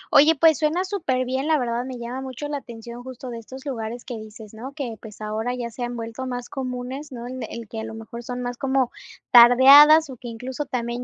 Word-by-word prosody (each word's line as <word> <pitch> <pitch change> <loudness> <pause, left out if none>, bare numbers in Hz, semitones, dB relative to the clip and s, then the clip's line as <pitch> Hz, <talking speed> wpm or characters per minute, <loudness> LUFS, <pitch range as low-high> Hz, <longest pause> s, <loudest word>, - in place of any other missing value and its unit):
Oye, 305 +3 +7
pues, 320 +2 +4
suena 315 +4 +1
superbién, 265 -8 -1
la 315 - +4
verdad 240 -1 -2
me 260 -1 -6
llama 240 +3 -5
mucho 265 +2 -6
la 290 - -3
atención 235 -2 -9
justo 255 0 -9
de 230 - -6
estos 260 +4 -11
lugares 240 -3 -5
que 245 - -5
dices, 215 0 -10
¿no? 245 +5 -8
Que, 275 -6 -4
pues, 215 -1 -12
ahora 220 +3 -2
ya 235 -2 -5
se 245 - -10
han 240 0 -3
vuelto 230 +3 -5
más 245 -1 -5
comunes, 260 +2 -5
¿no? 240 -1 -7
El 245 -2 -6
que 225 - -6
a - - -4
lo 225 0 -7
mejor 225 +1 -8
son 250 +1 -5
más 245 0 -4
como 265 -2 +1 0.4
tardeadas 275 +5 +8
o 255 - -9
que 245 - -10
incluso 250 +5 -5
también 240 -2 -3
250 Hz, 225 wpm, -23 LUFS, 235-270 Hz, 0.4 s, tardeadas